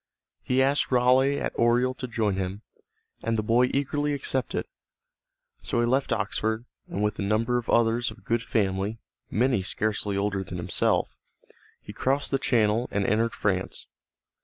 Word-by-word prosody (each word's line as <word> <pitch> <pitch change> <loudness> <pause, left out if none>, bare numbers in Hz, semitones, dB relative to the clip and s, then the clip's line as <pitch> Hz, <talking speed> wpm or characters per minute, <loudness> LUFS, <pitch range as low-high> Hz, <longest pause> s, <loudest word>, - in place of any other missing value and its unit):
He 130 +1 +2
asked 140 +1 +1
Raleigh 130 +3 +4
at - - -2
Oriel 120 +2 +3
to 130 0 -6
join 110 -4 0
him, 95 +2 -4 0.6
and 115 0 -1
the 110 - 0
boy 120 +3 +3
eagerly 145 +1 0
accepted. 135 -2 -1 1.0
So - - -1
he 120 - +3
left 130 +3 +1
Oxford, 110 +3 -1 0.2
and 100 - -3
with 105 0 -1
a - - 0
number 110 +4 +1
of 120 - -9
others 115 +1 +3
of 105 - -13
good 115 0 +1
family, 100 -2 -1 0.3
many 120 0 +2
scarcely 105 +1 -1
older 100 -1 -1
than 90 -1 -7
himself, 85 - 0 0.7
he - - -9
crossed 135 +2 0
the 135 - +1
Channel 115 -2 +2
and 100 -1 0
entered 115 +3 +1
France. 95 -2 -2
115 Hz, 160 wpm, -26 LUFS, 105-125 Hz, 1.0 s, Raleigh